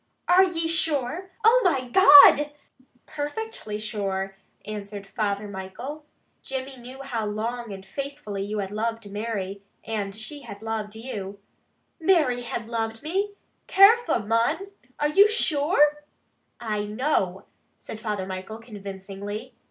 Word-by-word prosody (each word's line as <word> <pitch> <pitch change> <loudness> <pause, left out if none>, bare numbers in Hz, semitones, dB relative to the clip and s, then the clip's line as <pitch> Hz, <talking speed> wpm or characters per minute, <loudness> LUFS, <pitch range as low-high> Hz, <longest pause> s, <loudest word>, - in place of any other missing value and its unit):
"Are 365 +2 +7
ye 335 -3 0
sure? 325 +1 -1
Oh, 470 +3 +6
my 275 -9 +2
God!" 295 -1 +8 0.5
"Perfectly 295 - -5
sure!" 195 -3 -3 0.3
answered 205 -1 -6
Father 205 -1 -2
Michael. 225 +11 -7 0.3
"Jimmy 265 0 -5
knew 255 +3 -10
how 230 -5 -3
long 230 +2 -3
and 195 -1 -8
faithfully 275 -6 -5
you 205 +2 -3
had 195 -1 -3
loved 225 0 -3
Mary, 200 -2 -4 0.2
and 205 -3 -3
she 255 +7 -7
had 200 -5 -10
loved 220 -1 -3
you 205 -4 -6 0.3
" - - -45 0.3
"Mary 315 -8 +3
had 235 -1 -5
loved 225 0 -3
me? 390 +6 -1 0.3
Carefu', 395 - +5
mon! 240 - +1 0.3
Are 295 - +2
ye 395 +7 +7
sure?" 295 -7 +2 0.6
"I 215 -3 -2
know," 210 -4 -1 0.3
said 220 - -9
Father 210 -4 -3
Michael 190 +3 -6
convincingly. 200 -1 -8
230 Hz, 130 wpm, -25 LUFS, 205-295 Hz, 0.6 s, God